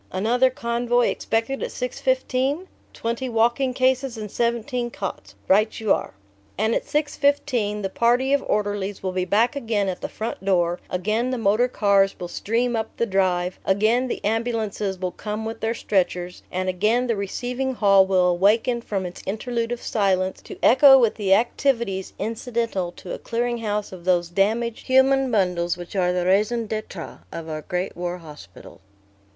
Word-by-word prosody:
"Another 240 Hz, +7 st, +2 dB
convoy 240 Hz, 0 st, 0 dB
expected 225 Hz, +5 st, -1 dB
at -, -, -2 dB
6.15? 260 Hz, +5 st, -1 dB, 0.3 s
Twenty 235 Hz, +3 st, -3 dB
walking 240 Hz, +3 st, +2 dB
cases 255 Hz, -1 st, +1 dB
and 210 Hz, -2 st, -6 dB
seventeen 240 Hz, +1 st, -1 dB
cots. -, -, -6 dB
Right 215 Hz, +3 st, +3 dB
you 215 Hz, -3 st, +3 dB
are!" -, -, -4 dB, 0.4 s
And 220 Hz, +2 st, +1 dB
at -, -, -1 dB
6.15 280 Hz, -8 st, 0 dB
the 195 Hz, -, -1 dB
party 245 Hz, +5 st, +2 dB
of 280 Hz, -, +3 dB
orderlies 205 Hz, -1 st, -1 dB
will 185 Hz, -, -1 dB
be 185 Hz, 0 st, -1 dB
back 220 Hz, +8 st, +2 dB
again 220 Hz, -7 st, -1 dB
at 185 Hz, -1 st, -3 dB
the -, -, -4 dB
front 220 Hz, -3 st, -5 dB
door, 175 Hz, -2 st, +1 dB
again 215 Hz, +7 st, 0 dB
the 255 Hz, -, -1 dB
motor 220 Hz, +2 st, +2 dB
cars 200 Hz, -5 st, +2 dB
will 175 Hz, -, -5 dB
stream 235 Hz, +6 st, -1 dB
up 220 Hz, -1 st, -4 dB
the 235 Hz, -, +1 dB
drive, 185 Hz, -3 st, 0 dB
again 220 Hz, +6 st, +2 dB
the 245 Hz, -, -4 dB
ambulances 220 Hz, -3 st, -1 dB
will 180 Hz, 0 st, -3 dB
come 210 Hz, +3 st, -5 dB
with 225 Hz, 0 st, -5 dB
their 225 Hz, +1 st, -1 dB
stretchers, 180 Hz, -4 st, -1 dB
and 185 Hz, +1 st, -2 dB
again 210 Hz, +7 st, +1 dB
the 235 Hz, -2 st, 0 dB
receiving 250 Hz, +6 st, -3 dB
hall 195 Hz, -3 st, +5 dB
will 185 Hz, -1 st, +2 dB
awaken 215 Hz, +7 st, +2 dB
from 195 Hz, -5 st, -3 dB
its 180 Hz, -, -7 dB
interlude 230 Hz, +3 st, -2 dB
of 240 Hz, -, -4 dB
silence 190 Hz, -3 st, 0 dB
to -, -, -10 dB
echo 270 Hz, +2 st, +8 dB
with 235 Hz, -4 st, +3 dB
the 200 Hz, -3 st, -2 dB
activities 230 Hz, -4 st, 0 dB
incidental 225 Hz, -4 st, -2 dB
to 180 Hz, -, -8 dB
a -, -, -5 dB
clearing 240 Hz, +1 st, -2 dB
house 210 Hz, -2 st, -2 dB
of 180 Hz, -2 st, -10 dB
those 175 Hz, -2 st, +2 dB
damaged 220 Hz, +5 st, 0 dB
human 265 Hz, 0 st, +4 dB
bundles 180 Hz, -5 st, +1 dB
which 175 Hz, +2 st, -9 dB
are 180 Hz, -2 st, +2 dB
the 180 Hz, -1 st, -1 dB
raison 215 Hz, +5 st, +2 dB
d'être 215 Hz, -5 st, -6 dB
of 165 Hz, -1 st, -6 dB
our 155 Hz, -1 st, -4 dB
great 180 Hz, +4 st, -3 dB
war 175 Hz, 0 st, -3 dB
hospital. 155 Hz, -4 st, -13 dB
220 Hz, 170 wpm, -23 LUFS, 190-240 Hz, 0.4 s, echo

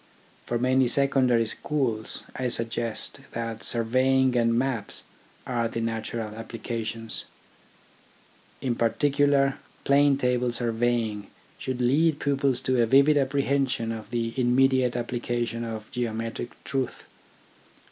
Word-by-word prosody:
For 120 Hz, -, 0 dB
many 130 Hz, +1 st, +3 dB
secondary 130 Hz, -3 st, +3 dB
schools 115 Hz, -2 st, -2 dB
I 130 Hz, -, -1 dB
suggest 115 Hz, -1 st, -2 dB
that 115 Hz, -1 st, -4 dB
surveying 130 Hz, +2 st, +2 dB
and 115 Hz, -1 st, +3 dB
maps 125 Hz, -5 st, -1 dB, 0.4 s
are 120 Hz, -2 st, 0 dB
the 115 Hz, -, -4 dB
natural 115 Hz, -1 st, -3 dB
applications. 115 Hz, 0 st, -4 dB, 1.4 s
In 130 Hz, -2 st, 0 dB
particular, 140 Hz, +3 st, +2 dB, 0.2 s
plane 140 Hz, 0 st, +4 dB
table 125 Hz, -2 st, +1 dB
surveying 115 Hz, -3 st, -1 dB, 0.3 s
should 130 Hz, -1 st, -3 dB
lead 145 Hz, +5 st, +3 dB
pupils 140 Hz, -3 st, +1 dB
to 130 Hz, -2 st, +2 dB
a 115 Hz, -, +3 dB
vivid 140 Hz, +5 st, +5 dB
apprehension 135 Hz, -3 st, +1 dB
of 110 Hz, -2 st, -6 dB
the 115 Hz, -1 st, -2 dB
immediate 130 Hz, 0 st, +3 dB
application 120 Hz, -1 st, -2 dB
of 110 Hz, -2 st, -6 dB
geometric 115 Hz, 0 st, -4 dB
truths. 135 Hz, -2 st, -3 dB
120 Hz, 110 wpm, -26 LUFS, 115-135 Hz, 1.4 s, vivid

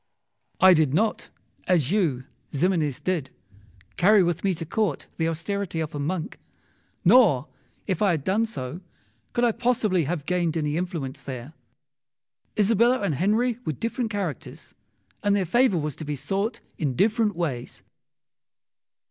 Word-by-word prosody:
Wolsey. 190 Hz, -, +8 dB
I -, -, +8 dB
did 155 Hz, -5 st, +2 dB
not, 215 Hz, +5 st, 0 dB, 0.4 s
as 165 Hz, -6 st, +2 dB
you, 165 Hz, -12 st, +1 dB, 0.3 s
Ximenes, 155 Hz, -3 st, +1 dB
did, 170 Hz, -8 st, -2 dB, 0.7 s
carry 200 Hz, +2 st, +5 dB
with 170 Hz, -1 st, -1 dB
me 190 Hz, -2 st, +1 dB
to 165 Hz, -, -5 dB
Court 195 Hz, -3 st, -1 dB
the 160 Hz, -, +1 dB
austerity 170 Hz, +2 st, -3 dB
of 160 Hz, 0 st, -3 dB
a 145 Hz, -, -4 dB
monk; 160 Hz, +3 st, -3 dB, 0.7 s
nor, 180 Hz, -, +5 dB, 0.4 s
if 185 Hz, -5 st, -2 dB
I 205 Hz, -, +4 dB
had 160 Hz, -6 st, 0 dB
done 215 Hz, +7 st, +1 dB
so, 155 Hz, -, -6 dB, 0.5 s
could 240 Hz, -, +1 dB
I 240 Hz, -, +4 dB
possibly 220 Hz, -, +1 dB
have 155 Hz, -1 st, -3 dB
gained 175 Hz, -2 st, 0 dB
any 150 Hz, -1 st, -1 dB
influence 165 Hz, -7 st, -3 dB
there. 130 Hz, +2 st, -7 dB, 1.0 s
Isabella 230 Hz, +4 st, +3 dB
and 195 Hz, -6 st, 0 dB
Henry 220 Hz, -, +1 dB
were 155 Hz, -, -2 dB
different 230 Hz, -, -2 dB
characters, 195 Hz, -, -5 dB, 0.5 s
and 205 Hz, 0 st, +2 dB
their 195 Hz, -2 st, +1 dB
favour 240 Hz, +2 st, +3 dB
was 150 Hz, -2 st, -2 dB
to -, -, -6 dB
be 150 Hz, -1 st, -3 dB
sought 200 Hz, -, -2 dB, 0.2 s
in 140 Hz, -5 st, -1 dB
different 215 Hz, -, +2 dB
ways. 145 Hz, -9 st, -4 dB
180 Hz, 150 wpm, -25 LUFS, 155-210 Hz, 1.0 s, Wolsey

